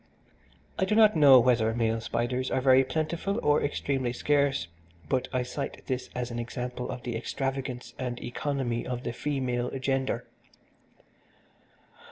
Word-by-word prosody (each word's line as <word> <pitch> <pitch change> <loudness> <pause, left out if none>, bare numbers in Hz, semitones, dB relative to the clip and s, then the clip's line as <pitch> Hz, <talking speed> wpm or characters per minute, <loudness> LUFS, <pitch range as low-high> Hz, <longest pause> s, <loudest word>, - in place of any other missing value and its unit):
I 190 - +3
do 210 - +1
not 215 -1 +6
know 140 -4 +8
whether 115 -2 +3
male 115 -1 0
spiders 125 +3 -1
are - - +1
very 130 0 +5
plentiful 165 - -2
or 150 0 +3
extremely 135 -3 -1
scarce, 140 - +1 0.4
but 125 - 0
I 125 -1 0
cite 135 +3 -5
this 130 -1 -3
as 125 -1 -3
an 120 - -4
example 125 +1 -4
of 125 - -6
the 120 -2 -3
extravagance 130 0 -3
and 125 -2 -3
economy 120 -1 -2
of 125 0 -4
the 120 - -3
female 125 -3 -1
gender. 135 0 -1
130 Hz, 145 wpm, -28 LUFS, 120-140 Hz, 0.4 s, know